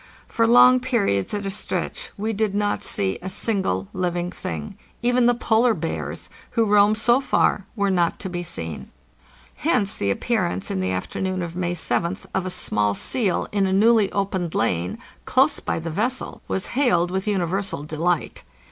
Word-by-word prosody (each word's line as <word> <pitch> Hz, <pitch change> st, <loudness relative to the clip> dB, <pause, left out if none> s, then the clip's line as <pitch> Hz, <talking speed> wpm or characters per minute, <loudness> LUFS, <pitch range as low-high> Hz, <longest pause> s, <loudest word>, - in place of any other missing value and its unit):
For 230 Hz, 0 st, +1 dB
long 250 Hz, +2 st, +7 dB
periods 225 Hz, -, 0 dB
at 205 Hz, -1 st, -3 dB
a 195 Hz, -, -2 dB
stretch 475 Hz, -, -3 dB
we 220 Hz, +2 st, -2 dB
did 210 Hz, -1 st, -1 dB
not 205 Hz, 0 st, 0 dB
see 95 Hz, -1 st, -1 dB
a 185 Hz, -, -5 dB
single 185 Hz, -, 0 dB
living 175 Hz, -1 st, -2 dB
thing; 75 Hz, -, -6 dB, 0.3 s
even 245 Hz, 0 st, +3 dB
the 245 Hz, -, +4 dB
polar 230 Hz, 0 st, +3 dB
bears, -, -, -4 dB, 0.3 s
who 225 Hz, -, +4 dB
roam 205 Hz, 0 st, +5 dB
so 240 Hz, +4 st, +3 dB
far, 205 Hz, -6 st, +1 dB
were 200 Hz, -2 st, +1 dB
not 175 Hz, -2 st, +1 dB
to -, -, -4 dB
be 175 Hz, -1 st, -4 dB
seen. 80 Hz, -, -5 dB, 0.7 s
Hence 215 Hz, -10 st, +1 dB
the 100 Hz, -, -1 dB
appearance 100 Hz, -, -1 dB
in 95 Hz, -, -1 dB
the 95 Hz, 0 st, -1 dB
afternoon 185 Hz, -, -2 dB
of 170 Hz, 0 st, -6 dB
May 175 Hz, -1 st, -1 dB
7th 170 Hz, +3 st, -1 dB
of 190 Hz, -1 st, -1 dB
a -, -, -2 dB
small 105 Hz, -, 0 dB
seal 210 Hz, -, 0 dB
in 200 Hz, -2 st, +1 dB
a 190 Hz, -, 0 dB
newly 215 Hz, 0 st, +4 dB
opened 190 Hz, -4 st, -2 dB
lane, 90 Hz, -4 st, 0 dB, 0.3 s
close -, -, +3 dB
by -, -, -2 dB
the 165 Hz, 0 st, -4 dB
vessel, 235 Hz, +10 st, -2 dB
was 190 Hz, -, -1 dB
hailed 180 Hz, -10 st, +2 dB
with 190 Hz, +2 st, -2 dB
uni 195 Hz, -4 st, +1 dB
versal 190 Hz, -4 st, -3 dB
delight. 165 Hz, +2 st, -1 dB
190 Hz, 175 wpm, -23 LUFS, 170-220 Hz, 0.7 s, long